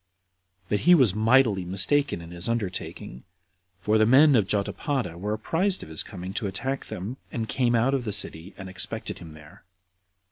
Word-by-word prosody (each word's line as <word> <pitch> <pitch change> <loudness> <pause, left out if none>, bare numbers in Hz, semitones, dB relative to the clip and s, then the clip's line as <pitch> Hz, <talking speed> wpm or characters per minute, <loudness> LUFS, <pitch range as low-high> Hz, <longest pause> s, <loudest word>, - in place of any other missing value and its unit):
But 105 - 0
he 175 +1 +6
was 130 - +4
mightily 110 -2 +3
mistaken 95 +5 +1
in 85 0 -11
his 85 +4 -4
undertaking; 95 - -4 0.6
for 105 +4 +1
the 110 - +4
men 140 +4 +6
of 105 -5 +2
Jotapata 105 - -2
were 100 +5 -4
apprized 175 - 0
of - - -11
his 80 - -1
coming 95 -2 -7
to 105 - -2
attack 135 +8 -4
them, 105 +9 -6
and 115 -2 -3
came 120 -1 +1
out 120 +4 +2
of 135 -2 0
the 110 - -3
city, 95 -3 -1
and 95 - -8
expected 95 - -4
him 80 -2 -11
there. 75 0 -16
105 Hz, 180 wpm, -25 LUFS, 95-130 Hz, 0.6 s, he